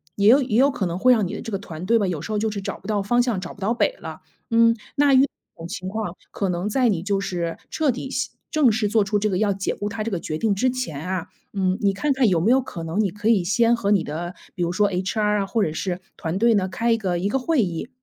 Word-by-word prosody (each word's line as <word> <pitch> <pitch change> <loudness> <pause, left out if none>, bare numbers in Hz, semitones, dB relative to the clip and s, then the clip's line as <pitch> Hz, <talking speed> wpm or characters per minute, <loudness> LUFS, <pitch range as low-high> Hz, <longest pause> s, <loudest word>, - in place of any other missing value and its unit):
也 200 0 +2
有 260 +6 +7
也 245 -4 0
有 275 +3 +5
可 195 -8 -2
能 170 0 -3
会 250 +6 +5
让 215 -6 +1
你 - - -5
的 - - -6
这 225 - -6
个 195 - -2
团 170 -3 -8
队 230 +4 +3
吧， 200 - +1
有 175 -4 -2
时 165 - -6
候 210 - 0
就 220 +1 0
是 205 -2 -4
找 - - -5
不 - - -12
到 210 -2 0
方 240 +5 +3
向， 240 -6 0
找 175 -2 -7
不 195 - -17
到 225 +5 +1
北 - - +1
了。 - - -8 0.3
嗯， 230 0 +4 0.2
那 285 -1 +4
遇 265 +1 +7
到 - - +2 0.3
这 - - -28
种 165 - -6
情 185 0 -5
况， 205 -3 -4 0.2
可 200 - -2
能 180 +2 -1
在 250 +3 +2
你 180 -6 0
就 200 0 0
是 175 -4 -3
彻 305 -4 +1
底 265 +2 -6
系 260 -1 -2 0.2
正 295 -7 +4
式 215 -1 0
做 215 0 +3
出 205 +1 0
这 210 +1 0
个 185 - 0
要 210 0 +2
解 195 0 -2
雇 205 - -3
他 215 0 -4
这 - - -1
个 185 -6 -3
决 155 - -3
定 215 0 +1
之 255 +6 +2
前 235 - -4
啊， 185 -2 -3 0.2
嗯， 190 -2 0
你 200 - +3
看 280 +9 0
看 260 -4 +3
有 175 -3 +2
没 190 +8 +2
有 265 +1 +5
可 185 -8 -8
能， 165 +6 -1
你 205 - +1
可 210 +4 -4
以 220 -5 +4
先 230 +6 +3
和 205 -3 -1
你 195 -5 +3
的 175 +4 -5 0.2
比 180 - -1
如 170 - 0
说 205 +3 +2
HR 210 +3 0
啊， - - -1
或 220 +2 0
者 155 - -1
是 180 +2 -3 0.2
团 165 +2 -3
队 230 +2 +4
呢， 190 -3 +1
开 230 +5 +1
一 - - +2
个 185 -5 -1
一 185 - 0
个 270 +6 0
会 275 0 +2
议， 175 +4 -3
205 Hz, 330 characters per minute, -23 LUFS, 185-230 Hz, 0.3 s, 有